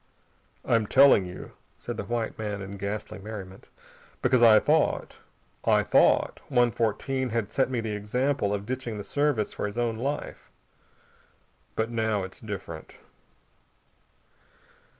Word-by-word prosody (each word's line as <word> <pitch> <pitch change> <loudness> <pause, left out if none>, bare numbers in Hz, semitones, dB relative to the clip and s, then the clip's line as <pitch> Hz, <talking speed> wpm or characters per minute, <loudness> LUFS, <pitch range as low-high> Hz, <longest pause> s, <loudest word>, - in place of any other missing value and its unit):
"I'm 115 -3 +2
telling 135 -7 +6
you," 90 - -9 0.3
said - - -6
the - - -4
white 120 -1 -2
man 105 -2 -3
in 95 - -8
ghastly 100 +1 -5
merriment, 95 -2 -9 0.5
"because 130 -2 +3
I 110 -2 +8
thought - - +1 0.5
I - - +3
thought - - +3
One 120 -3 +3
Fourteen 125 +4 -1
had 110 -2 -2
set 130 - +1
me 125 -3 -1
the 110 -2 -3
example 110 +2 0
of 100 -1 -2
ditching 125 -2 -4
the 105 - -5
Service 145 -4 0
for - - -3
his 105 - -8
own 120 -2 0
life. 140 +5 -4 1.3
But 110 +1 -1
now 110 -3 0
it's 95 0 -8
different." 95 -7 -8
110 Hz, 135 wpm, -27 LUFS, 105-120 Hz, 1.3 s, I